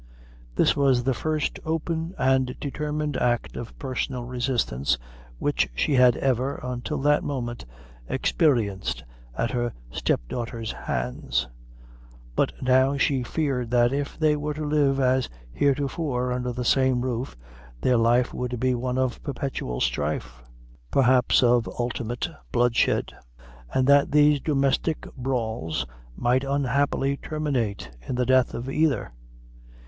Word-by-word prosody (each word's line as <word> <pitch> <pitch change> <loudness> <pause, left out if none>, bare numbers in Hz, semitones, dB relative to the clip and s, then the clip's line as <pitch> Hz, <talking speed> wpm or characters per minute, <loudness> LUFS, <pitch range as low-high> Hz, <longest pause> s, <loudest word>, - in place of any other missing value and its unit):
This - - +3
was 135 -3 +3
the 135 +1 +1
first 155 +4 -2
open 165 +2 -2
and 130 -1 +2
determined 150 +1 -2
act 120 -1 0
of 120 - -7
personal 130 -1 -3
resistance 120 - 0 0.4
which - - 0
she 145 - +1
had 125 -2 +5
ever, 130 +1 0
until 125 +4 -3
that 150 0 +3
moment, 120 - -4 0.4
experienced 100 - +1 0.3
at 115 - 0
her 120 -1 -1 0.2
step - - 0
daughter's 115 - -4
hands; 60 0 -2 0.9
but - - +2
now 130 +2 +4
she 135 -1 +2
feared 125 -2 -1
that, 120 +1 +3
if 140 0 -3
they 155 -1 +3
were 150 0 -3
to 155 0 -3
live, 145 -2 +2
as 130 -1 +2 0.2
heretofore, 135 - 0
under 125 0 -1
the 125 0 -4
same 130 -1 +3
roof, 125 - -3 0.4
their 125 -1 +3
life 120 +2 +3
would 125 -1 -3
be 130 +1 +2
one 125 +1 -2
of 130 -2 -1
perpetual 135 - -4
strife 60 -1 -2 0.5
perhaps 130 - +4
of 120 -1 +3
ultimate 120 +2 -2 0.2
bloodshed 120 -1 +2 0.6
and 130 - +2
that 140 +1 +5
these 150 0 +5
domestic 140 +2 0
brawls 110 - -2 0.3
might 125 +2 +2
unhappily 140 0 +1
terminate 130 - -2 0.2
in - - -2
the 125 0 +1
death 130 0 +3
of 120 +2 -5
either. 140 - +1
130 Hz, 130 wpm, -25 LUFS, 120-140 Hz, 0.9 s, had